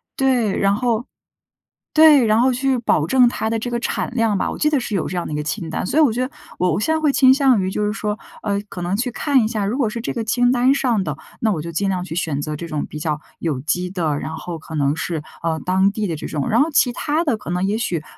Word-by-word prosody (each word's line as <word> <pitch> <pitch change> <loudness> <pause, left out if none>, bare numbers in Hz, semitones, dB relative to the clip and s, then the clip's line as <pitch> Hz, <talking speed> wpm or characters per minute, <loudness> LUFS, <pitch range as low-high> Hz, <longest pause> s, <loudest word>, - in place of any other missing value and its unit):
对， 250 -6 +1
然 195 0 +3
后 235 +1 0 0.9
对， 305 -5 +7
然 215 +1 +3
后 255 +2 +4
去 265 +1 +1
保 160 -9 +1
证 250 +4 +5
它 220 - -2
的 225 0 -1
这 245 +2 -4
个 240 - -1
产 235 - -2
量 225 -4 +2
吧， - - -1
我 - - -6
记 300 - +2
得 295 -3 +1
是 230 - -4
有 175 - -1
这 180 - -4
样 175 - -2
的 - - -6
一 - - -2
个 150 - -2
清 160 +2 -4
单。 160 - -3
所 285 - 0
以 - - +7
我 270 -7 +4
觉 245 - -2
得 - - -11 0.3
我 180 -1 +2
我 160 - 0
现 315 +9 +1
在 - - +1
会 300 -3 +2
倾 260 -1 +6
向 265 -7 +3
于 185 - -1
就 210 +2 -1
是 210 - 0
说， 210 -1 -3 0.2
呃， 200 -1 -1
可 180 - -7
能 175 +3 -1
去 250 +4 -1
看 275 -4 +2
一 - - +1
下， 215 -3 -2
如 215 +7 -1
果 250 -6 +2
是 235 +2 -5
这 230 - -3
个 230 - -3
清 245 +2 +2
单 255 +2 +3
上 245 -8 +1
的， 150 -3 -3 0.2
那 220 -2 +2
我 155 -5 -3
就 170 - -6
尽 195 +4 -1
量 185 -2 -1
去 170 - -6
选 150 -5 -1
择 150 0 -4
这 170 - -6
种 155 -3 -3
比 150 - -8
较 150 -1 -2 0.2
有 150 -6 -2
机 180 +6 -1
的， 165 -6 -1
然 160 - -5
后 175 -2 -6
可 160 0 -11
能 145 0 +1
是， 165 -2 -3 0.2
嗯， 160 -1 -1
当 190 +2 +2
地 210 0 -2
的 165 - -2
这 - - -6
种。 145 -3 -3
然 230 - +3
后 295 - +3
其 255 -3 +3
它 300 +6 -1
的 285 -8 +1
可 215 - -11
能 180 +1 0
也 205 +3 0
许， 180 -8 -2
210 Hz, 315 characters per minute, -20 LUFS, 170-245 Hz, 0.9 s, 对